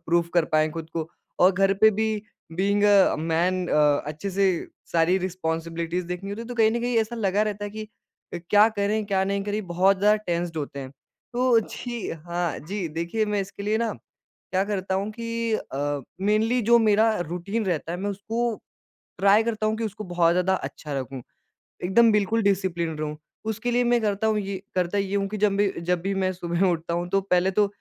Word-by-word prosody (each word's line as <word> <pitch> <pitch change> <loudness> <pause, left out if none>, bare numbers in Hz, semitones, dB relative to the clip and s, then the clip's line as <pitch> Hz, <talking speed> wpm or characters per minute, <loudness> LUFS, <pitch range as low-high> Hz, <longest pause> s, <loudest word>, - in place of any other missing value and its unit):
Proof 170 0 +2
कर 170 -2 +4
पाए 155 0 +2
खुद 160 0 -7
को। 160 -1 -3 0.3
और 185 +2 +6
घर 195 +1 +3
पे 215 +3 +6
भी 220 +1 0 0.5
बीइंग 200 +2 +1
अ, 200 -2 +5
मैन 170 +3 0
अ, 150 -1 +3
अच्छे 155 +6 -4
से 190 -2 +1 0.3
सारी 170 +2 +3
रिस्पांसिबिलिटीज़ 170 -1 -3
देखनी 180 +3 -5
होती 205 +3 -5
है, - - -9
तो 245 - -5
कहीं 220 -2 +4
न 235 +1 -1
कहीं 240 0 -1
ऐसा 225 +2 -1
लगा 205 -2 +1
रहता 205 -1 -3
है 205 - -5
कि 215 +1 -6 0.5
अ, - - -2
क्या 210 +1 +7
करें, 215 0 -1
क्या 195 -1 +1
नहीं 200 +1 -1
करें 205 0 -3
बहुत 185 +3 +3
ज़्यादा 210 +2 +4
टेंस्ड 170 -1 -2
होते 145 -2 -4
हैं। 130 -1 -7 0.4
तो 245 -1 +4
जी 240 0 -5
हाँ 170 +1 -3
जी, 190 +4 -4
देखिए 170 +8 -1
मैं 210 -1 0
इसके 195 +1 -7
लिए 210 +2 +1
ना 230 -1 0 0.6
क्या 190 0 +2
करता 195 -2 -2
हूँ 200 +3 -1
कि 230 0 -3
अ, 145 -5 -3 0.2
मेनली 215 +5 +2
जो 235 +2 +5
मेरा 220 0 +4 0.2
रूटीन 195 +6 -2
रहता 165 -2 -2
है 175 - -4
मैं 200 +2 -2
उसको 225 +3 -2 0.6
ट्राई 200 +3 +5
करता 220 -2 -1
हूँ 215 0 0
कि 225 - -3
उसको 215 0 -5
बहुत 175 -2 +2
ज़्यादा 180 +2 +2
अच्छा 155 -4 -6
रखूँ, 130 -1 -6 0.6
एकदम 225 +6 +5
बिल्कुल 210 +2 +2
डिसिप्लिनड 175 -5 0
रहूँ। 150 0 -3 0.3
उसके 220 +3 -2
लिए 245 +1 +2
मैं 240 0 +3
करता 210 0 0
हूँ, 215 -1 +2
ये 195 -1 -4 0.2
करता 180 +2 0
ये 195 0 -1
हूँ 200 0 0
कि 215 - -4
जब 205 -1 +2
भी 200 -1 +2
जब 175 +1 0
भी 195 +1 -1
मैं 190 -1 0
सुबह 175 +1 0
उठता 170 0 -2
हूँ 175 +1 -2
तो 195 +1 +3
पहले 185 -1 +2
तो 205 - +5
195 Hz, 205 wpm, -25 LUFS, 175-215 Hz, 0.6 s, क्या